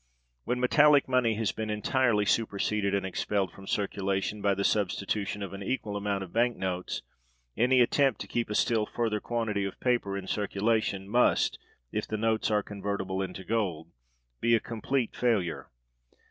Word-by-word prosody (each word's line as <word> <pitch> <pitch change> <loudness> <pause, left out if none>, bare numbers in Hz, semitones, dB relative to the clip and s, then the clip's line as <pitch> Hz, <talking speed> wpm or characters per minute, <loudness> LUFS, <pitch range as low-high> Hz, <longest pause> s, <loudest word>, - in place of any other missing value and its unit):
When 125 +2 -1
metallic 145 +3 +5
money 125 -4 +2
had 110 -1 -1
been 110 -1 -3
entirely 105 0 +2
superseded 100 -1 +1
and 100 - -1
expelled 95 +1 -1
from 95 0 -13
circulation, 100 0 -1
by 100 -1 +2
the 100 - -1
substitution 100 0 0
of 100 - -6
an 100 - -7
equal 105 -1 -2
amount 100 -1 -1
of 90 - -11
bank 120 +1 +2
notes, 90 -1 -3 0.5
any 125 +3 +4
attempt 135 -1 +3
to - - -6
keep 120 -2 -2
a 105 - -2
still 110 -1 +2
further 110 -3 -1
quantity 110 -3 -1
of 100 - -5
paper 120 -6 0
in 95 - -6
circulation 100 -1 0
must, 120 +4 +2 0.3
if - - -2
the 110 - -2
notes 110 0 +1
are 105 -1 +2
convertible 100 -2 -3
[into 95 0 -5
gold], 90 -7 -2 0.5
be 115 0 +4
a - - +3
complete 115 +3 -2
failure. 110 -9 0
105 Hz, 165 wpm, -29 LUFS, 100-115 Hz, 0.5 s, metallic